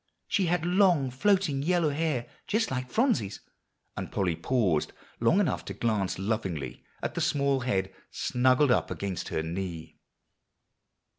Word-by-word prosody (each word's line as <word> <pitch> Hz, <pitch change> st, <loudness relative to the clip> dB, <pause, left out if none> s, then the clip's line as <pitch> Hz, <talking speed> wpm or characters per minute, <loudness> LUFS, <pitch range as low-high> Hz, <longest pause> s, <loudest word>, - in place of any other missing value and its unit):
She 190 Hz, -3 st, +1 dB
had 170 Hz, -1 st, +1 dB
long 175 Hz, -7 st, +3 dB
floating 180 Hz, 0 st, +2 dB
yellow 170 Hz, 0 st, +2 dB
hair, 145 Hz, -5 st, -1 dB, 0.2 s
just 220 Hz, -3 st, +1 dB
like 125 Hz, -1 st, -3 dB
Phronsie's;" 220 Hz, -, +1 dB, 0.6 s
and -, -, -5 dB
Polly 95 Hz, -5 st, 0 dB
paused 95 Hz, -, +1 dB, 0.3 s
long 120 Hz, -, +4 dB
enough 195 Hz, -7 st, 0 dB
to -, -, -6 dB
glance 105 Hz, -5 st, 0 dB
lovingly 95 Hz, -6 st, -3 dB, 0.2 s
at -, -, -2 dB
the -, -, -2 dB
small 140 Hz, -1 st, +2 dB
head 95 Hz, -7 st, -1 dB, 0.2 s
snuggled 130 Hz, +2 st, +2 dB
up -, -, +2 dB
against 100 Hz, -3 st, -4 dB
her 80 Hz, -, -2 dB
knee. 85 Hz, -1 st, -5 dB
130 Hz, 140 wpm, -28 LUFS, -, 0.6 s, long